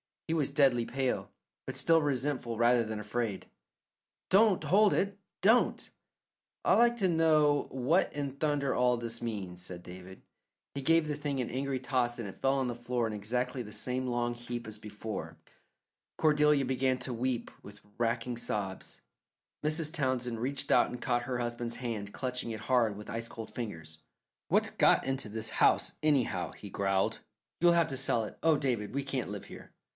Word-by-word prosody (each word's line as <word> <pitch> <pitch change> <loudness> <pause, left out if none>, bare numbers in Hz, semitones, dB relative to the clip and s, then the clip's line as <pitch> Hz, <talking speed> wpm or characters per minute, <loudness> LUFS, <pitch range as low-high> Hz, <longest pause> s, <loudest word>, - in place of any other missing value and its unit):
He 160 - 0
was 150 -4 +1
deadly 135 -4 +3
pale, 130 0 -1 0.4
but - - -4
still 165 -1 +4
resentful 130 -4 -1
rather 120 +1 +4
than 110 0 -4
afraid. 105 0 -3 0.8
"Don't 200 0 +5
hold 205 +2 +4
it; 200 0 0 0.2
don't!" 225 +5 +3 0.7
"I'd - - +4
like 235 0 +5
to 190 -5 +2
know 155 -3 +3
what 135 +8 +1
in 145 -2 -3
thunder 145 -2 0
all 125 0 +3
this 115 -1 -4
means?" 100 -6 -4
said 90 -1 -8
David. 95 +1 -11 0.5
He 140 - -4
gave 165 +3 +3
the 150 - -1
thing 145 -2 -2
an 120 - -3
angry 135 +1 -2
toss 125 -2 0
and 115 -4 -4
it - - -11
fell 135 +1 +2
on 135 -2 0
the 120 - -2
floor 120 0 -2
in 110 - -3
exactly 125 +5 -2
the 105 -3 -8
same 130 0 -2
long 120 -1 0
heap 120 0 -6
as 110 -1 -6
before. 105 +1 -6 0.8
Cordelia 150 -2 +4
began 130 0 +1
to 125 0 -3
weep 120 0 -2
with 100 0 -13 0.2
racking 120 +1 -1
sobs. 100 -5 -4 0.6
Mrs. 155 +1 0
Townsend 130 -6 -1
reached 135 +4 -2
out - - +5
and 125 - -7
caught 120 -1 0
her 125 -2 -3
husband's 120 0 -3
hand, 110 -5 -4
clutching 125 -2 -3
it 110 -1 -5
hard 115 -2 +2
with 105 +1 -9
ice 115 +1 -3
cold 115 -1 -9
fingers. 80 -9 -6 0.5
"What's - - +3
got - - +4
into 135 -3 -2
this 110 +1 -4
house, - - +4
anyhow?" 145 -5 +1
he - - -10
growled. 95 -1 0 0.4
"You'll 175 0 +5
have 170 -1 +3
to 135 - -2
sell 125 -4 +1
it. 105 - -8
Oh, 160 -2 +4
David, 125 -5 -1
we 140 - 0
can't 135 -5 -3
live 100 -1 -6
here." - - -12
125 Hz, 180 wpm, -31 LUFS, 115-140 Hz, 0.8 s, Don't